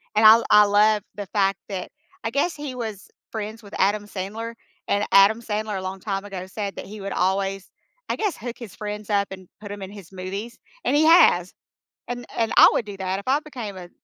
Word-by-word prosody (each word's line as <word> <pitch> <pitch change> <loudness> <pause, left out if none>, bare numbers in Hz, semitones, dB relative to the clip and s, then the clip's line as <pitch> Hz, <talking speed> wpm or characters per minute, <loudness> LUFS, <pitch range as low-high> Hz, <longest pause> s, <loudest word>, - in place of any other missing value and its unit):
And 220 - +4
I 215 - +12
l 230 +1 +3
I 210 0 +8
love 210 0 +4
the 205 - -5
fact 195 -1 +1
that 190 -3 -4 0.3
I - - -1
guess 285 +6 0
he 290 -3 -6
was 220 -5 -6 0.2
friends 220 +1 -5
with 200 - -14
Adam 205 +2 +2
Sandler, 215 +4 -5 0.3
and 205 +1 +1
Adam 200 +4 +6
Sandler 215 -2 -3
a 190 - -4
long 190 +1 -5
time 195 0 -3
ago 190 -3 -6
said 200 0 -5
that - - -7
he 210 +3 -9
would 195 0 -4
always, 195 +1 0 0.4
I - - +1
guess, 420 -4 -1
hook 240 0 -6
his 235 -5 -10
friends 210 0 -6
up 200 -1 +2
and 185 -1 -9
put 205 - -8
them 205 0 -7
in 190 - -6
his 200 -4 -12
movies, 195 +5 -6 0.3
and - - +1
he 305 +2 +4
has. 185 - +6 0.6
And 245 0 -4
and 225 -1 +1
I - - +10
would 225 - -1
do 205 -1 -7
that 190 0 -2
if 200 - -8
I 280 +3 +3
became 240 -10 -7
a 180 -1 -9
205 Hz, 225 wpm, -24 LUFS, 195-225 Hz, 0.6 s, I